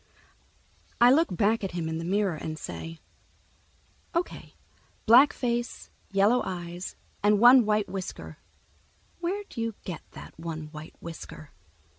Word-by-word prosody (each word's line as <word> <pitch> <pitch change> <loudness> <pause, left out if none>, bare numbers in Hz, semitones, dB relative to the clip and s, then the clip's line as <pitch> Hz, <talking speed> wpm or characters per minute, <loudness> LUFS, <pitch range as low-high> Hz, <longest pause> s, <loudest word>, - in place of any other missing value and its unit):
I 240 +1 +7
look 320 +5 +4
back 210 +4 +1
at 190 - -3
him 170 -2 -2
in 160 0 -3
the - - -4
mirror 195 +1 +1
and 155 0 -5
say, 165 +1 -7 1.2
"O.K., 340 +1 -3 0.5
black 250 +6 +8
face, 240 -1 -3 0.2
yellow 205 +5 +3
eyes, 175 0 -6 0.3
and 210 +1 +4
one 240 0 +8
white 210 -1 +2
whisker. 190 -2 -6 0.8
Where'd 380 0 -4
you 230 -2 -2
get 175 -5 -6
that - - -12
one 160 -2 -5
white 155 0 -10
whisker?" 160 -2 -9
200 Hz, 130 wpm, -27 LUFS, 170-240 Hz, 1.2 s, black